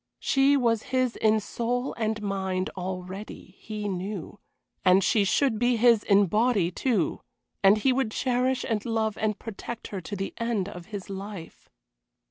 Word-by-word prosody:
She 275 +1 +3
was 230 -4 +2
his 255 -2 +1
in 220 0 +3
soul 245 +4 -2
and 220 -2 -2
mind 190 -2 -2
already, 185 +1 -6
he 210 -1 -5
knew, 195 +1 -5 0.4
and 185 +1 +5
she 210 +2 +3
should 225 +3 +2
be 245 +1 +3
his 230 -1 +5
in 200 0 +5
body, 210 -2 +2
too, 210 - 0 0.4
and 195 +2 +6
he 260 +5 +2
would 265 -3 0
cherish 255 +2 0
and 215 -2 -1
love 220 -2 -1
and 215 -1 -1
protect 230 +1 -7
her 195 -2 -5
to 205 +4 -6
the 195 0 -4
end 230 -5 -1
of 180 -3 -9
his 205 -3 -7
life. 195 -3 -8
215 Hz, 160 wpm, -27 LUFS, 195-235 Hz, 0.4 s, and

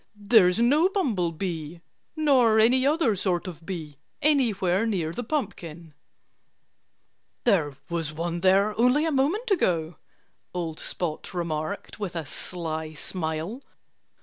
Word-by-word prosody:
"There's 205 -3 +4
no 290 +10 +4
bumblebee 175 - -2 0.4
nor 260 -8 +4
any 255 +4 +4
other 290 -8 +2
sort 180 -2 -1
of 165 -2 -9
bee 155 -6 -6 0.2
anywhere 225 - +2
near 175 -7 -1
the 245 - -4
pumpkin." 170 - -4 1.5
"There 160 - +2
was 165 -3 -2
one 170 +2 -3
there 195 +3 +3
only 250 +6 +4
a 325 - 0
moment 335 - 0
ago," 170 - +1 0.6
old 165 -3 -3
Spot 165 -4 -4
remarked 170 +4 -4
with 195 -4 -4
a 165 -2 -3
sly 160 +1 -5
smile. 160 - -4
185 Hz, 120 wpm, -26 LUFS, 165-245 Hz, 1.5 s, There's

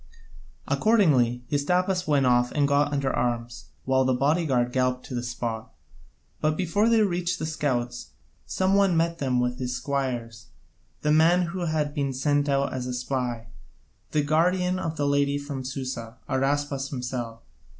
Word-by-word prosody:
Accordingly 140 - +3
Hystaspas 180 +5 +1
went 145 -3 +3
off 125 -1 +3
and 145 -1 +2
got 145 +1 +2
under 140 -2 0
arms, 120 -1 -2 0.2
while 130 0 +3
the 130 -1 +2
bodyguard 135 -3 +1
galloped 125 -1 0
to - - -8
the 120 - -1
spot. 120 -2 -4 0.7
But 155 0 0
before 205 +5 +2
they 225 -2 +4
reached 180 -2 -1
the 155 - -3
scouts, 125 -6 -2 0.4
some 190 +1 +1
one 195 -4 +4
met 165 0 0
them 130 -3 +1
with 125 0 -1
his 125 -1 -2
squires, 125 -4 -3 0.6
the 150 - +2
man 165 +4 +5
who 175 +1 -3
had 155 -2 -1
been 140 -3 -1
sent 145 +2 +1
out 140 0 +1
as 125 -1 -3
a 125 - -3
spy, 125 -2 -3 0.6
the 150 - +1
guardian 180 +5 +2
of 165 -2 -3
the 145 - 0
lady 140 0 +2
from 140 -2 -5
Susa, 130 -3 -5
Araspas 140 +1 -1
himself. 125 -3 -5
140 Hz, 160 wpm, -26 LUFS, 125-160 Hz, 0.7 s, man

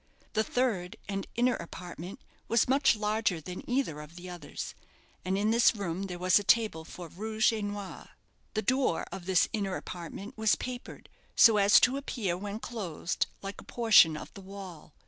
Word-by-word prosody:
The 220 - +2
third, 220 -8 -1
and 195 -1 -3
inner, 245 +1 +3
apartment 175 +1 -8 0.3
was 230 - +3
much 275 0 +4
larger 210 -4 0
than 180 +4 -7
either 245 - 0
of 150 +2 -12
the 180 +1 -8
others, 170 -5 -7 0.5
and 185 +1 0
in 210 +2 +2
this 235 0 +5
room 195 -1 -3
there 180 -2 -5
was 180 +2 +4
a - - -5
table 210 -6 +2
for 175 +1 -9
rouge 220 +6 0
et 215 -2 -3
noir. 205 -1 -6 0.5
The 215 - 0
door 255 -6 +1
of 185 -2 -7
this 185 -2 +4
inner 200 -4 -1
apartment 180 +4 -7
was 220 -1 +3
papered 250 -1 -7 0.3
so 225 -2 +7
as 200 0 +7
to 255 +2 +4
appear 225 -10 -2
when 200 +3 -5
closed 195 -8 -3 0.2
like 195 +1 -6
a - - -14
portion 220 -10 +5
of - - -9
the 195 - -10
wall. 190 -6 -10
200 Hz, 180 wpm, -30 LUFS, 180-220 Hz, 0.5 s, so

